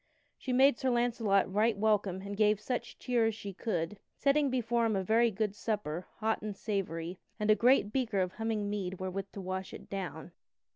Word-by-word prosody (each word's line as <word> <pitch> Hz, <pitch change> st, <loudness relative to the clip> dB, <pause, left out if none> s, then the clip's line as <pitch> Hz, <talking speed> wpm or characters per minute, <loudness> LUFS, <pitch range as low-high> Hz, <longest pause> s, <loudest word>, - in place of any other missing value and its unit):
She 260 Hz, -, -5 dB
made 265 Hz, 0 st, +5 dB
Sir 265 Hz, -, +1 dB
Launcelot 230 Hz, -6 st, +2 dB
right 215 Hz, +1 st, +3 dB
welcome 200 Hz, -3 st, +1 dB
and 200 Hz, 0 st, -5 dB
gave 210 Hz, 0 st, +3 dB
such 245 Hz, +3 st, -4 dB
cheer 240 Hz, -3 st, +1 dB
as 225 Hz, -, -1 dB
she 200 Hz, -3 st, -7 dB
could, 185 Hz, -2 st, -2 dB, 0.2 s
setting 280 Hz, 0 st, +3 dB
before 235 Hz, -2 st, +1 dB
him 215 Hz, -, 0 dB
a 190 Hz, -, 0 dB
very 230 Hz, +4 st, +4 dB
good 210 Hz, -1 st, -1 dB
supper, 205 Hz, -6 st, -3 dB
hot 220 Hz, 0 st, 0 dB
and 210 Hz, -2 st, -5 dB
savory, 180 Hz, -4 st, -3 dB, 0.2 s
and 210 Hz, 0 st, +3 dB
a -, -, +6 dB
great 240 Hz, -3 st, +4 dB
beaker 230 Hz, -7 st, 0 dB
of 185 Hz, -1 st, +1 dB
humming 220 Hz, -1 st, -2 dB
mead 190 Hz, -3 st, -3 dB
wherewith 190 Hz, +1 st, -4 dB
to 200 Hz, -, -6 dB
wash 185 Hz, 0 st, -4 dB
it -, -, -13 dB
down. 180 Hz, -4 st, -5 dB
210 Hz, 195 wpm, -32 LUFS, 190-230 Hz, 0.2 s, a